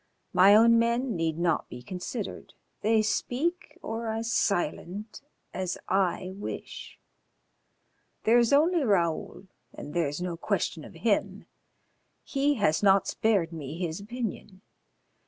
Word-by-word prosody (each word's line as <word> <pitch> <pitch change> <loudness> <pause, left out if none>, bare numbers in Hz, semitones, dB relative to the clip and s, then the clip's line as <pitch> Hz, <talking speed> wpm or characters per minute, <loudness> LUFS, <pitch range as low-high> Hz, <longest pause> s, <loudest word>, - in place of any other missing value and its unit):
My 200 +2 +7
own 230 +1 +6
men 235 0 +1
need 165 -2 -1
not 170 -2 0
be 125 0 -9
considered, 190 - -6 0.3
they 220 +1 +3
speak 320 - -2
or 225 +1 -4
are 220 +1 -2
silent 205 -2 -1 0.3
as 185 -1 -3
I 185 -1 0
wish. 205 - -7 1.3
There 235 +2 +5
is 235 -1 +2
only 320 +3 +4
Raoul, 180 -4 0 0.3
and 145 - -8
there 170 -3 +1
is 145 +3 -4
no 175 -1 -3
question - - -2
of - - -12
him. - - 0 0.8
He 285 +1 +1
has 200 - +1
not 195 -1 +5
spared 195 -7 +1
me 155 -1 -6
his 170 -1 -3
opinion. 215 -3 -6
205 Hz, 130 wpm, -28 LUFS, 175-230 Hz, 1.3 s, My